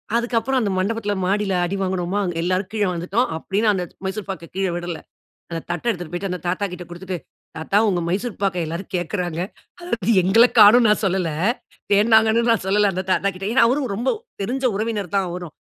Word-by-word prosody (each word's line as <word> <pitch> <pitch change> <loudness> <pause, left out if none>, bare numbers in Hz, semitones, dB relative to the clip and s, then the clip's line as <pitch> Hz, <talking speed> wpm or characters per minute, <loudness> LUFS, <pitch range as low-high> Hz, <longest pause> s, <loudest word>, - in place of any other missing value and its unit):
அதுக்கு 235 0 0
அப்புறம் 265 +2 0
அந்த 205 -3 0
மண்டபத்தில 205 +2 -1
மாடில 195 0 0
அடி 190 - -3
வாங்குனோமா! 185 +1 -1 0.2
எல்லாரும் 185 +2 -1
கீழ 215 - 0
வந்துட்டோம். 185 +8 0
அப்டியும் 200 +6 -1
நான் 210 - +4
அந்த 180 - -2 0.2
மைசூர் 195 +1 -4
பாக்க 170 -3 -6
கீழ 195 0 0
விடல. 175 -1 -4 0.5
அந்த 165 -1 -3
தட்ட 175 +4 -3
எடுத்துட்டு 175 -4 -5
போயிட்டு, 190 +2 -3
அந்த 180 -2 -4
தாத்தா 185 +3 -1
கிட்ட 180 0 -7
குடுத்துட்டு, 180 +1 -5 0.4
தாத்தா 180 +6 +1
உங்க 180 -3 +1
மைசூர் 205 +5 -3
பாக்க 190 -2 +1
எல்லாரும் 170 +6 -6
கேக்கறாங்க, 175 -1 -3 0.4
அதாவது 235 - -1
எங்கள 225 +7 +6
காணோன்னு 225 +3 +8
நான் 210 - +2
சொல்லல, 185 -3 0 0.6
தேடுனாங்கனும் 220 +2 +4
நான் 225 - -1
சொல்லல 205 +1 +3
அந்த 185 +1 -3
தாத்தா 200 - +1
கிட்ட 195 +2 -5
ஏனா 235 -1 +5
அவரும் 260 -4 0
ரொம்ப 240 +4 -2 0.3
தெரிஞ்ச 260 +6 -2
உறவினர் 210 -4 -3
தான் 195 -2 +1
அவரும், 175 -3 -7
195 Hz, 190 wpm, -21 LUFS, 180-220 Hz, 0.6 s, காணோன்னு